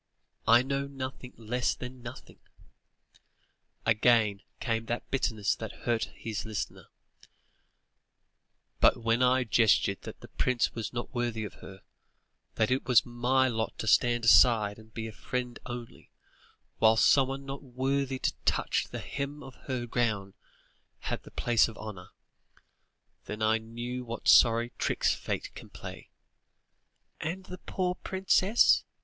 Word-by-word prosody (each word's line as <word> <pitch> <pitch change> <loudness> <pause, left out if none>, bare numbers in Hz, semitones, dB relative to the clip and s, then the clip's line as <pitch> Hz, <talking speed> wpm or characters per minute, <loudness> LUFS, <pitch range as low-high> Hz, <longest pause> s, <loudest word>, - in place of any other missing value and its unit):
I 115 +2 +7
know 140 +1 -2
nothing, 130 -2 -7
less 120 +3 -1
than 125 0 -8
nothing" 120 +1 -10 1.5
again 110 -2 +3 0.2
came 115 -2 -2
that 120 - -4
bitterness 110 -6 +1
that 110 -2 -8
hurt 115 -2 +1
his 110 -2 -4
listener 110 -2 -5 1.9
"but - - +5
when 115 +1 +1
I 130 +1 +4
guessed 110 -1 +4
that 100 - -5
the - - -10
prince 125 -2 0
was 115 -3 -4
not 120 0 -5
worthy 120 -3 -2
of 105 - -6
her, 95 0 -12 0.7
that 110 +1 +1
it 130 +1 0
was 125 -4 +5
my 125 +2 +2
lot 110 -3 -2
to - - -4
stand 120 +1 +3
aside 110 -3 +5
and 110 0 -16
be 110 0 -5
a - - -7
friend 125 +2 -4
only, 120 -2 -8 0.7
whilst 110 0 +5
someone 135 0 +2
not 135 0 -6
worthy 135 +1 -1
to - - -1
touch - - 0
the - - -6
hem 140 +1 -5
of 135 - -10
her 130 -3 -2
gown, 110 -5 -1 0.7
had - - -3
the - - -14
place 120 -2 +2
of 115 - -10
honour, 100 -4 -8 1.2
then 105 +1 -4
I 110 +1 +3
knew 120 +3 -6
what 120 -1 -6
sorry 115 +1 +6
tricks - - +1
Fate - - -4
can - - -11
play!" - - -10 1.1
"And 175 +4 -4
the 185 -1 -9
poor 180 -2 -2
princess?" 190 +4 +3
120 Hz, 140 wpm, -29 LUFS, 110-130 Hz, 1.9 s, I